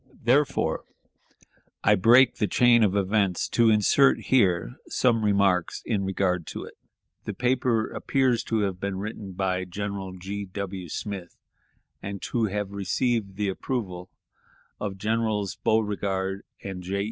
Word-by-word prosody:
Therefore 130 +4 +2 1.0
I 105 - +5
break 120 +6 +5
the 105 - +1
chain 120 +1 +5
of 100 -2 +2
events 100 -2 +1
to 115 -1 +4
insert 110 +6 +4
here 90 - +1
some 115 -3 +2
remarks 100 -4 +1
in 105 -4 0
regard 90 -3 0
to - - -6
it. - - -11 0.5
The - - -4
paper 125 -3 +1
appears 130 -4 +1
to 110 -1 0
have 95 -3 -2
been 100 -1 -3
written 100 -1 -6
by 95 0 -1
General 100 0 -5
G. 100 +3 -5
W. 95 -2 -6
Smith, 95 0 -6 0.6
and 100 0 -5
to 115 -2 0
have 105 -1 -3
received 100 +1 -1
the 105 0 -1
approval 95 -4 -4 0.7
of 100 -2 -4
Generals 110 -1 -1
Beauregard 100 -3 0 0.2
and 95 -2 -6
J. 95 +2 -3
100 Hz, 135 wpm, -26 LUFS, 95-110 Hz, 1.0 s, I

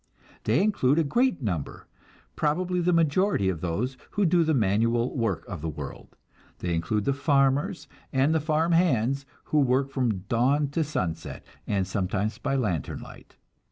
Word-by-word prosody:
They 120 - +3
include 160 -10 +2
a 165 - +4
great 240 - +1
number, 90 -10 -3 0.5
probably 180 +4 0
the 175 +1 +2
majority 165 - +2
of 85 -4 -3
those 110 +10 -2 0.2
who 205 - +3
do 170 0 +4
the 160 -1 +1
manual 115 +2 +1
work 100 - -1
of 90 -6 -6
the 80 - -2
world. 75 - -8 0.4
They 90 -1 -2
include 100 +6 -1
the 140 - +2
farmers 140 +3 +1 0.2
and 135 +3 +2
the 160 - +3
farm 155 +2 +1
hands, 140 -5 +2 0.2
who 155 - +1
work 135 0 +2
from 120 -8 0
dawn 135 +6 +2
to 160 +3 0
sunset, 90 - -4 0.2
and 100 -2 0
sometimes 100 +2 -2
by 135 - -1
lantern 95 - -2
light. - - -14
135 Hz, 160 wpm, -26 LUFS, 105-155 Hz, 0.5 s, a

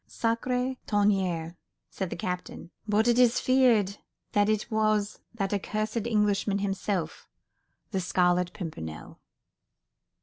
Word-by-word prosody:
"Sacré 250 +3 -1
tonnerre," 190 -5 +1 0.3
said 190 -2 -3
the - - -4
captain, 180 0 -5 0.2
"but 215 +2 +2
it 240 0 +4
is 245 -2 +5
feared 235 -7 +3 0.3
that 205 0 +3
it 215 +2 -1
was 215 -1 +1 0.2
that 195 -2 -1
accursed 215 +3 -2
Englishman 210 -2 +1
himself—the 195 0 -5
Scarlet 180 0 +2
Pimpernel." 80 - -7
205 Hz, 105 wpm, -28 LUFS, 185-220 Hz, 0.3 s, is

